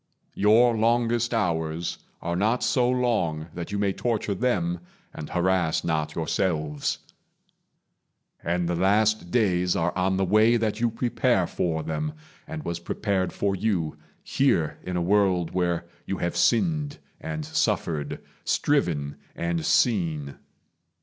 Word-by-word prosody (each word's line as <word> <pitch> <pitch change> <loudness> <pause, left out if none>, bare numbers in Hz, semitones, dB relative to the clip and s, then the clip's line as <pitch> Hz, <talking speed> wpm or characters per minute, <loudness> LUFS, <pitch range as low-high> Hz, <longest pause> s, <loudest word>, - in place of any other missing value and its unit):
Your 115 +4 +4
longest 120 +1 +2
hours 85 -6 -1 0.2
Are 85 +1 -1
not 110 +7 +1
so 125 -2 +2
long 105 -11 0
that 85 +3 -6
you 100 - -1
may 100 -1 +1
torture 110 -3 -1
them 90 -6 0 0.3
And 75 - -7
harass 90 -2 +1
not 75 -2 -1
yourselves; 80 -3 -1 1.5
and 85 +1 0
the 90 - 0
last 100 +2 +2
days 90 -4 +2
Are 85 +1 0
on 95 +1 +1
the 95 - +2
way 110 +5 +4
that 110 -1 -1
you 120 - +3
prepare 115 +2 +1
for 80 -2 -2
them, 155 0 -3 0.3
And 160 -1 -6
was 85 0 -3
prepared 95 +1 -1
for 100 -1 -1
you, 90 -6 -1 0.3
here 85 - +1
in 90 -1 -3
a 85 - 0
world 95 -2 +2
Where 85 -2 0 0.2
you 95 - -2
have 85 - -2
sinned 145 +3 +2 0.2
and 155 -1 -4
suffered, 105 - -1 0.2
striven 80 - 0 0.2
and 85 -1 -1
seen. 80 - +1
95 Hz, 135 wpm, -26 LUFS, 85-115 Hz, 1.5 s, Your